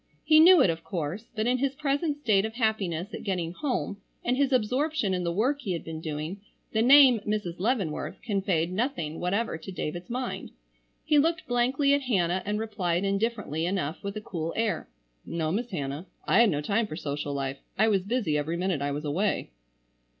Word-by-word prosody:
He 310 -1 +6
knew 345 0 +8
it 180 - +4
of 165 0 -6
course, 180 +4 -4
but 215 0 0
in 250 +1 +2
his 275 0 0
present 285 +2 0
state 215 -9 +2
of 220 +1 -4
happiness 205 -5 -1
at - - -5
getting 180 -4 -2
home, 245 - -2 0.3
and 245 - +2
his 280 +1 +2
absorption 255 -1 +1
in 180 -1 -1
the 170 - 0
work 255 +11 +1
he 195 -7 -2
had 170 - -4
been 160 -1 -6
doing, 155 +5 -4 0.3
the 220 - +1
name 260 -1 +8
"Mrs. 205 -5 -3
Leavenworth" 200 -7 -1
conveyed 190 -6 0
nothing 185 - -2
whatever 195 0 -1
to 190 - -8
David's 175 0 -5
mind. 250 +1 -4 0.6
He 300 - +4
looked 325 +3 +1
blankly 255 +4 +2
at 285 - +2
Hannah 185 -8 +1
and 210 +1 0
replied 190 -5 -1
indifferently 195 -5 -1
enough 180 -5 -2
with 200 +1 -4
a - - -4
cool 165 -5 -4
air. 225 - -1 0.3
"No, 160 -2 -2
Miss 230 +6 -2
Hannah, 145 -1 -4 0.2
I 195 - +4
had 235 -2 +6
no 150 -5 0
time 210 +8 0
for 155 - -6
social 145 -2 -3
life. 135 0 -3 0.2
I 220 - +4
was 200 -3 +3
busy 200 -7 0
every 160 +4 -2
minute 180 -4 -1
I 140 - 0
was 145 +2 -4
away." 170 - -1
200 Hz, 195 wpm, -27 LUFS, 170-240 Hz, 0.6 s, knew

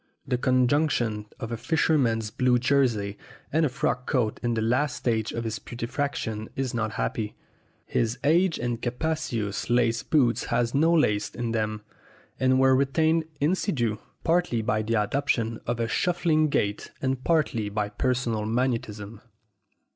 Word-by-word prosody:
The 125 -2 0
conjunction 125 -4 +1
of 115 - -5
a 115 - -2
fisherman's 120 -7 +1
blue 125 +1 +3
jersey 120 -6 +1 0.3
and 160 0 +3
a - - -4
frock 125 -2 -2
coat 120 -6 0
in 120 -1 0
the 110 - 0
last 130 +5 +1
stage 110 -3 -1
of 115 - -3
putre 115 +2 -5
faction 115 -6 -3
is 130 -2 -2
not 110 -2 -1
happy. 105 -1 -2 0.5
His 115 +2 0
aged 165 +4 +3
and 120 -1 -3
capacious 120 -7 -2
lace 120 -1 +2
boots 130 -7 +2
had 120 0 0
no 160 +4 +4
laces 105 -11 +2
in 120 -1 -2
them, 110 -1 -2 0.6
and 130 0 +3
were 135 0 +5
retained 160 +4 +2
in 150 +5 +2
situ 120 - -1 0.2
partly 165 -9 +1
by 110 -2 +1
the 115 +2 -1
adoption 115 0 0
of 120 0 -1
a 115 - 0
shuffling 160 +1 +2
gait 105 -6 -1
and 130 -1 -1
partly 140 -10 +1
by 105 0 -2
personal 115 -1 -1
magnetism. 115 -3 -2
120 Hz, 150 wpm, -26 LUFS, 110-140 Hz, 0.6 s, were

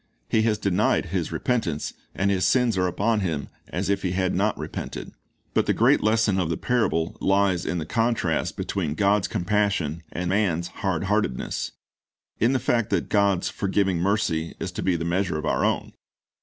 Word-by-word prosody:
He 110 - +2
has 110 -1 +2
denied 100 -3 +1
his - - -1
repentance, 100 -12 -1 0.2
and 100 +1 +1
his 95 -2 +1
sins 125 -4 +3
are 90 -1 +2
upon 105 +5 +1
him 80 -8 -2 0.2
as 90 +4 -3
if 100 0 +1
he 90 -2 -1
had 95 0 0
not - - +1
repented. - - -6 0.4
But - - +2
the - - +2
great - - +4
lesson 110 -2 +2
of 90 -3 0
the 80 - -1
parable 110 -10 0
lies 95 -3 +2
in 90 - -1
the 80 - -3
contrast 115 +6 0
between 80 -7 -2
God's 100 -1 +2
compassion 90 -5 0
and 90 +1 -3
man's 90 -3 +1
hard 95 -5 -2
heartedness; 100 -10 -1 0.7
in 120 +5 +3
the - - +3
fact 120 -3 +1
that - - 0
God's 100 -3 +2
forgiving 95 -2 0
mercy 85 -4 0
is - - -3
to - - -5
be 95 -2 +1
the 85 0 -2
measure 85 -1 0
of 75 - -4
our - - +1
own. - - 0
95 Hz, 185 wpm, -25 LUFS, 85-105 Hz, 0.7 s, great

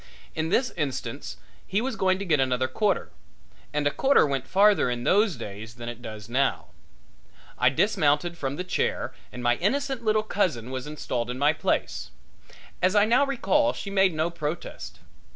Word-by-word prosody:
In 160 0 -2
this 250 +7 +2
instance 145 -5 -4 0.3
he 200 - +1
was 250 +1 -2
going 185 -2 +2
to 200 - -5
get 155 -5 +2
another 130 -1 +1
quarter, 205 +5 0 0.6
and 150 0 -1
a 145 - +3
quarter 270 - +4
went 135 -2 -2
farther 200 -7 +4
in 120 -1 -3
those 205 - +3
days 110 0 -8
than 120 -1 -8
it 120 0 -8
does 110 -3 -8
now. 135 +3 0 0.9
I 125 - +4
dismounted 150 +1 +1
from 140 -4 -3
the 180 - -3
chair 185 - -1 0.2
and 125 - -7
my 120 0 +3
innocent 270 +5 -1
little 215 -1 +2
cousin 155 - -1
was 130 +1 -4
installed 125 -5 -3
in 125 - -3
my 145 +3 +3
place. - - -1 0.7
As 185 +2 +3
I 205 0 +6
now 250 +5 +3
recall 290 +2 +2
she 200 - -6
made 190 -3 +3
no 160 +2 0
protest. 160 -1 -5
155 Hz, 175 wpm, -26 LUFS, 130-205 Hz, 0.9 s, I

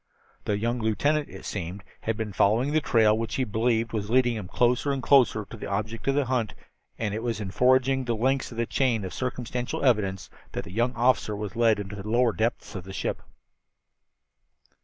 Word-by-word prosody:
The 105 - 0
young 120 +3 -1
lieutenant, 145 +7 +1
it - - -10
seemed, 95 0 -5 0.2
had 115 -1 -2
been 110 -2 -4
following 120 +10 +2
a 155 - +4
trail 110 -5 +4
which 115 0 -3
he 130 - +1
believed 115 0 0
was 105 -2 -2
leading 120 0 +3
him 105 -4 -5
closer 125 +7 +1
and 135 -2 -2
closer 125 -6 +4
to - - -9
the - - -7
object 110 +4 -3
of 135 - +3
the 145 -1 +2
hunt, 120 -4 -1 0.4
and 105 -3 -2
it 110 - -3
was 115 -2 -2
in 100 -3 -4
forging 130 +3 +3
the 120 -1 0
links 130 +4 0
of 115 - -9
this 115 0 0
chain 120 -7 +1
of 95 - -6
circumstantial 125 0 -3
evidence 100 -6 +1 0.3
that - - -3
the 85 - -10
young 120 +4 0
officer 120 -3 +2
was 105 +1 -5
led 115 -2 +3
into 100 0 -6
the 100 +1 -7
lower 120 0 +3
depths 115 +1 -2
of 95 -4 -6
the 95 +1 -9
ship. - - -3
115 Hz, 205 wpm, -26 LUFS, 105-125 Hz, 0.4 s, a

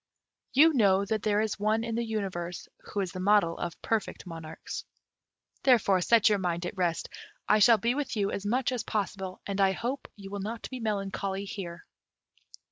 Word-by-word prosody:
You 315 +4 +7
know 200 -6 +4
that 215 +1 -1
there 210 0 +2
is 215 -2 -2
one 215 +2 +1
in 230 0 -3
the 235 +1 0
universe 190 -6 -4 0.2
who 205 - -2
is 185 -3 -3
the 185 - -6
model 190 -3 +3
of 175 0 -4
perfect 225 -3 -1
monarchs. 165 -2 -7 0.8
Therefore 220 -8 +4
set 230 +4 +5
your 210 -2 +3
mind 175 -1 -1
at 175 - -4
rest; 175 -3 0 0.4
I 215 - +5
shall 225 +2 +7
be 230 +4 +1
with 285 -2 -2
you 200 -2 0
as 200 - -3
much 245 +5 +1
as 250 -3 -1
possible, 195 -3 -3
and 200 0 -1
I 190 -1 +4
hope 250 +7 -3
you 195 -2 -10
will 200 - -4
not 225 +3 -5
be 255 - -5
melancholy 195 -2 -2
here." 180 -4 -7
200 Hz, 190 wpm, -29 LUFS, 190-225 Hz, 0.8 s, You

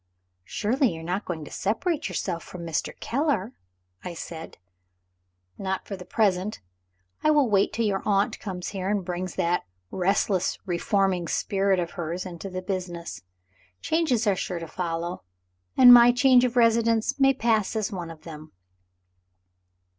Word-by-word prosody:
"Surely 235 - 0
you 160 - -8
are - - -10
not 180 +5 -3
going 160 -4 -5
to - - -12
separate 300 - -1
yourself 170 - -3
from 175 -2 -9
Mr. 165 -3 -3
Keller?" 255 -5 -1 0.5
I 175 - -6
said. 165 -1 -8 1.0
"Not 190 -1 -3
for 200 - -5
the 180 -1 -10
present. 195 0 0 0.6
I 305 - +4
will 295 -4 +4
wait 200 -3 +2
till 230 - -1
your 195 -2 0
aunt 200 0 +1
comes 180 -3 -5
here, 190 -1 -4
and 205 -3 -1
brings 180 0 -4
that 170 - 0 0.2
restless 190 0 +1
reforming 185 0 0
spirit 195 0 +1
of 170 -1 -3
hers 175 +1 -4
into 180 +1 -7
the 185 0 -5
business. 180 - -5 0.6
Changes 310 -9 +1
are 200 -2 +3
sure 180 -1 -3
to 165 -1 -6
follow 170 +1 -4 0.6
and 250 -1 +10
my 240 0 +8
change 250 0 +5
of 245 -1 -2
residence 230 +1 +3
may 270 0 +5
pass 225 -4 +1
as 215 0 -1
one 175 -4 -5
of 160 -2 -12
them." 155 -4 -10
195 Hz, 155 wpm, -26 LUFS, 175-230 Hz, 1.0 s, and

